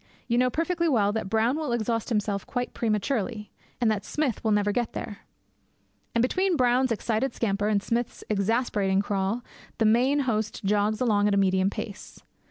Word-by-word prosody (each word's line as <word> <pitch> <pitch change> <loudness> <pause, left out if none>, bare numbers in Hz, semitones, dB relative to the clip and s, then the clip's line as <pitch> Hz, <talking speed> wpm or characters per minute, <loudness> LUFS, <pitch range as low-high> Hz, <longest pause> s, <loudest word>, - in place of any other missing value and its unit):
You 235 0 +2
know 250 0 +3
perfectly 335 +4 0
well 210 -7 +3
that 210 -2 -3
Brown 225 +6 +2
will 310 -5 -2
exhaust 230 -1 -1
himself 210 -3 -1
quite 245 -1 -3
prematurely, 215 -1 -1 0.3
and 235 -2 +3
that 210 -2 -2
Smith 295 -7 -2
will 220 - +1
never 205 -1 +2
get 235 +2 -1
there. 205 - -6 1.0
And 230 - +3
between 370 +7 +1
Brown's 250 0 +3
excited 230 +3 -1
scamper 205 -2 0
and 205 -2 +1
Smith's 235 +2 -2
exasperating 205 -2 +1
crawl 200 +4 -1 0.3
the 225 - +2
main 255 +6 +3
host 220 -5 -2
jogs 210 +2 +1
along 210 -4 +3
at 205 - +2
a - - +2
medium 190 0 +3
pace. 205 0 -7
220 Hz, 175 wpm, -26 LUFS, 205-245 Hz, 1.0 s, know